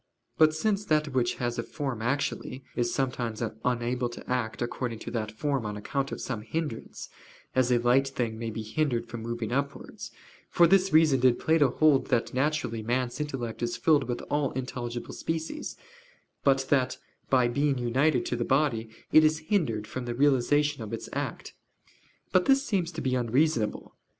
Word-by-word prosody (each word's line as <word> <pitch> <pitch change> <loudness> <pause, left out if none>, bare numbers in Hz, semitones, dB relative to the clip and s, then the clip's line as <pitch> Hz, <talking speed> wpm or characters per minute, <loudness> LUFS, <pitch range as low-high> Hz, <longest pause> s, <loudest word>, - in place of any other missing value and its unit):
But 155 -1 +6
since 205 +4 0
that 155 -4 +2
which 125 -3 0
has 120 -1 -2
a - - +2
form 130 -2 -4
actually, 130 +1 -2
is 120 -1 0
sometimes 120 -4 -2 0.2
unable 120 0 0
to 120 - -10
act 120 -2 -1
according 120 -1 -3
to - - -7
that 110 -3 -2
form 135 +3 -1
on 105 -1 -4
account 135 +6 -2
of - - -4
some 115 -5 -4
hindrance, 145 +1 -5 0.5
as 130 -1 +2
a 125 - +5
light 125 +3 +3
thing 120 -4 -3
may 115 -1 -3
be 110 0 -5
hindered 120 0 -1
from 115 0 -7
moving 115 0 -4
upwards; 140 +2 -3 0.4
for 175 - +5
this 190 +2 +4
reason 155 -4 +5
did 125 -1 +4
Plato 160 -4 +3
hold 145 +1 +3
that 115 - 0
naturally 130 -4 0
man's 120 +3 -1
intellect 130 -6 -4
is 120 0 -1
filled 145 +3 +3
with 120 0 -3
all 145 -2 0
intelligible 120 -2 -5
species, 165 - -4 0.7
but 135 -1 +3
that, 130 -3 +2 0.3
by 130 -2 +4
being 140 +3 +1
united 125 +3 +2
to - - -1
the 120 - -1
body, 130 -4 +1 0.2
it 155 - +7
is 155 0 +4 0.2
hindered 115 - +1
from 120 +3 -5
the 120 -1 -3
realization 145 +1 +2
of 110 0 -6
its 115 - -5
act. - - -4 0.8
But 185 -1 +4
this 275 +1 +4
seems 185 - 0
to 160 - -4
be 130 -2 0
unreasonable. 125 -1 0
130 Hz, 175 wpm, -28 LUFS, 120-150 Hz, 0.8 s, it